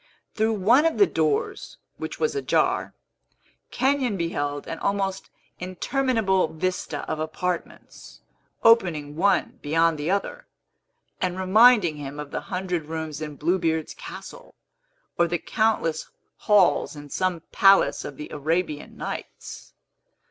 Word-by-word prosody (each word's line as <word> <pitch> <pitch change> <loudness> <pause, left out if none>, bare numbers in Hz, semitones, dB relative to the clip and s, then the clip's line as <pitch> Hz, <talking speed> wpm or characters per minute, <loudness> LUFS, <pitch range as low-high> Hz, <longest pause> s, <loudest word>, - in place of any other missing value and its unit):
Through 220 +1 +1
one 235 - +4
of 325 - -2
the 405 - +7
doors, 430 +4 -1 0.2
which - - -6
was 465 -2 0
ajar, 415 - 0 0.7
Kenyon 265 -5 +1
beheld 145 -4 -2
an 165 - -6
almost 195 -1 -2 0.3
interminable 190 0 0
vista 160 -2 -3
of 155 - -3
apartments, 170 +3 -5 0.4
opening 165 -10 +3
one 195 +5 +1
beyond 165 +1 +2
the 150 +3 -2
other, 200 - -2 0.7
and 185 -1 -1
reminding 195 -3 +5
him 145 0 -7
of 150 -1 -7
the - - -3
hundred 180 -3 -3
rooms 160 -1 -5
in 150 -1 -5
Blue 170 +6 0
Beard's 160 -2 -1
castle, - - -10 0.6
or 170 - +4
the 175 +1 -1
countless 210 -6 0 0.3
halls 200 -5 +3
in 145 -1 -11
some 185 -3 -1
palace 195 0 +4
of 145 - -8
the 150 - -8
Arabian 155 +1 -2
Nights. - - -8
180 Hz, 125 wpm, -24 LUFS, 155-210 Hz, 0.7 s, the